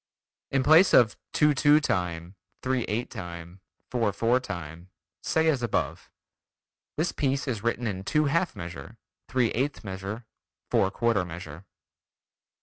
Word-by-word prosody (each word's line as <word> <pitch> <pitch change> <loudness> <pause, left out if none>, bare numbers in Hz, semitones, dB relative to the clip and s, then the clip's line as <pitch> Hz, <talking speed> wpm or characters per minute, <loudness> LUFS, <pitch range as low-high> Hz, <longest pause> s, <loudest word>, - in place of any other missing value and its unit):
In 135 -1 +1
place 160 +7 +6
of: 110 -3 +5 0.2
"two 150 -1 +4
two 145 +2 +5
time, 90 - -2 0.3
three 130 -2 0
eight 115 +4 -3
time, 85 -3 -8 0.3
four 115 -4 +1
four 115 +5 +2
time," 85 -7 -7 0.3
say 160 0 +1
as 145 -6 +2
above: 120 - -2 0.9
"This 160 +4 +1
piece 140 0 -1
is 115 -6 -2
written 120 +2 -1
in 95 -4 -3
two 150 +9 +1
half 170 +5 +1
measure, 85 0 -8 0.3
three 125 -3 +1
eighth 135 +3 -2
measure, 100 +3 -6 0.5
four 95 - +3
quarter 115 -1 +1
measure." 85 0 -9
115 Hz, 140 wpm, -27 LUFS, 95-135 Hz, 0.9 s, place